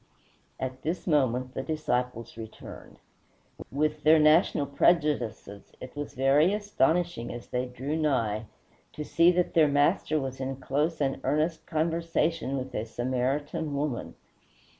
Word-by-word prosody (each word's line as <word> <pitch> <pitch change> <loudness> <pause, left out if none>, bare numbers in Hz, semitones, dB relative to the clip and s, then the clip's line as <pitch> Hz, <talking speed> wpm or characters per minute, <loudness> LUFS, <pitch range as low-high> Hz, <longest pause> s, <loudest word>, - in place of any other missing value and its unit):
At 130 0 -4
this 170 +3 -3
moment 130 -5 +1
the - - -3
disciples 125 -6 -2
returned. 110 -1 -10 0.7
With 150 +2 0
their 155 +2 +6
national 155 -1 +4
prejudices, 140 - 0
it 130 - -10
was 145 0 -6
very 140 +8 +4
astonishing, 175 - 0
as 120 0 -8
they 125 +1 -1
drew 130 +5 -4
nigh, 115 -9 0 0.5
to 150 - -5
see 170 +3 +4
that 180 0 0
their 160 -2 +5
Master 145 +2 +2
was 130 -1 -5
in 135 0 -3
close 150 +5 -1
and 135 -1 0
earnest 155 +4 0
conversation 165 -2 0
with 130 -1 -5
a 110 - -2
Samaritan 135 +6 -2
woman. 140 -4 -3
145 Hz, 135 wpm, -28 LUFS, 130-155 Hz, 0.7 s, their